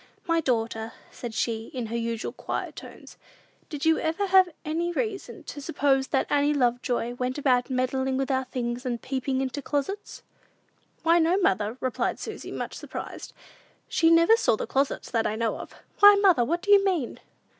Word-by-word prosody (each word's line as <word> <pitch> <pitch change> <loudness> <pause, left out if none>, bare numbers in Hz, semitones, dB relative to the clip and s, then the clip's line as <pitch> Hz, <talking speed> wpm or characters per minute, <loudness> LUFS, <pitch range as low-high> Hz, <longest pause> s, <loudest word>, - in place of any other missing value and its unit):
"My 330 0 +2
daughter," 225 -4 -1 0.2
said 235 -2 -7
she, 225 -1 -1
in 245 -2 -2
her 225 +1 -5
usual 230 -1 -2
quiet - - -5
tones, - - -12 0.5
"did 295 -2 -4
you 320 0 +4
ever 325 +6 -1
have 375 -1 +5 0.2
any 335 +3 -1
reason 400 +2 -4
to 290 - -8
suppose 270 -1 +1
that 270 - +1
Annie 290 +1 +2
Lovejoy 245 -2 0
went 250 +2 -3
about 255 -3 +2
meddling 260 +1 0
with 270 +1 -1
our 260 0 0
things, 245 -1 -4
and 245 -3 -2
peeping 260 +1 -2
into 265 +2 -3
the - - -33
closets?" 305 +8 -3 0.8
"Why, 335 +1 +5
no, 335 +3 +3
mother," 215 - +1
replied 255 -2 -1
Susy, - - -7
much - - -5
surprised; - - -7 0.5
"she 325 - +3
never 335 +6 +6
saw 460 - +2
the - - -4
closets, 275 -9 -1
that 225 -2 +1
I 210 - -2
know 230 0 -1
of. - - -10 0.2
Why, 410 0 +9
mother, 385 -10 +4
what 340 +8 -1
do 410 - 0
you 400 -1 +7
mean?" 355 -11 -1
270 Hz, 180 wpm, -26 LUFS, 245-330 Hz, 0.8 s, Why